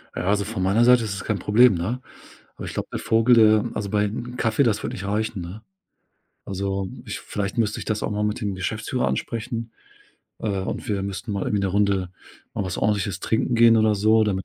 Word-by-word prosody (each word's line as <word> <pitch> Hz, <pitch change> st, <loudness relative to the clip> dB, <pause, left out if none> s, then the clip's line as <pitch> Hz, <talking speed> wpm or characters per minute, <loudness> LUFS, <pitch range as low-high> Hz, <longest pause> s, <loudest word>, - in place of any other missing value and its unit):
Ja, -, -, -3 dB
also, 100 Hz, +1 st, +1 dB
von 105 Hz, -3 st, -3 dB
meiner 100 Hz, +5 st, +3 dB
Seite 125 Hz, -1 st, +6 dB
ist 105 Hz, -3 st, -3 dB
das -, -, -7 dB
kein 105 Hz, -3 st, 0 dB
Problem, 110 Hz, +3 st, +5 dB
ne? 105 Hz, +10 st, -3 dB, 0.6 s
Aber -, -, -7 dB
ich -, -, -7 dB
glaube, -, -, -3 dB
der -, -, -2 dB
Vogel 115 Hz, +2 st, +4 dB
der 110 Hz, -2 st, +5 dB
also, 100 Hz, -2 st, -3 dB
bei 105 Hz, 0 st, +1 dB, 0.3 s
Kaffee, 110 Hz, +2 st, +1 dB
das 115 Hz, -6 st, +1 dB
wird -, -, -3 dB
nicht 95 Hz, -, -6 dB
reichen, 105 Hz, 0 st, -2 dB
ne? 90 Hz, +6 st, -8 dB, 0.8 s
Also, 95 Hz, 0 st, -3 dB, 0.2 s
ich -, -, -5 dB
vielleicht 100 Hz, +2 st, -4 dB
müsste 105 Hz, -2 st, +1 dB
ich -, -, -6 dB
das 110 Hz, -1 st, -2 dB
auch -, -, -1 dB
mal 105 Hz, 0 st, -1 dB
mit 105 Hz, 0 st, -1 dB
dem 100 Hz, -3 st, -2 dB
Geschäftsführer 110 Hz, +6 st, -2 dB
ansprechen, 115 Hz, 0 st, -3 dB, 0.7 s
äh, -, -, -5 dB
und 95 Hz, -, -4 dB
wir 100 Hz, -2 st, -1 dB
müssten 100 Hz, +3 st, -4 dB
mal 100 Hz, -1 st, -2 dB
irgendwie 105 Hz, -1 st, 0 dB
'ne -, -, +2 dB
Runde 100 Hz, -2 st, +1 dB, 0.4 s
mal 100 Hz, -, -2 dB
was 90 Hz, -2 st, -3 dB
Ordentliches 100 Hz, -3 st, 0 dB
trinken 115 Hz, +2 st, 0 dB
gehen 115 Hz, 0 st, +6 dB
oder 110 Hz, -1 st, +3 dB
so, 110 Hz, +2 st, +4 dB
damit 95 Hz, -3 st, -1 dB
105 Hz, 215 wpm, -23 LUFS, 100-110 Hz, 0.8 s, Seite